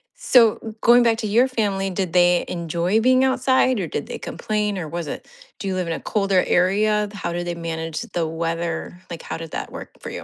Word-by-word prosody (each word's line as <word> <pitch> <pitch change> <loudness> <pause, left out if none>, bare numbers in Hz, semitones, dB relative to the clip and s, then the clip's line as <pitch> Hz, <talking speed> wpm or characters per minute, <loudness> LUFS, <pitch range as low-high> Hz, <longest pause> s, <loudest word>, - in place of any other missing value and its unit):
So, 225 - +3
going 240 +1 +6
back 225 -1 +3
to 215 - -2
your 235 +5 +4
family, 200 -6 -1
did 185 -2 -3
they 175 0 +4
enjoy 170 +5 0
being 255 +2 +4
outside, 260 -2 +2
or 175 - -2
did 145 - -4
they - - -5
complain, 210 -2 -2
or 165 -4 -4
was 170 -1 -5
it - - -6 0.3
Do 200 - -4
you 190 - -1
live 180 -2 -2
in 165 - -1
a - - -4
colder 195 -3 +1
area? 210 +3 +2
How 200 - -4
do 175 0 -2
they 175 0 -4
manage 165 -1 -4
the 165 -2 -3
weather? 165 +1 -3
Like, 170 -1 -7
how - - -5
did 165 -1 -8
that - - -5
work - - -8
for - - -6
you? - - -7
190 Hz, 225 wpm, -22 LUFS, 170-215 Hz, 0.3 s, going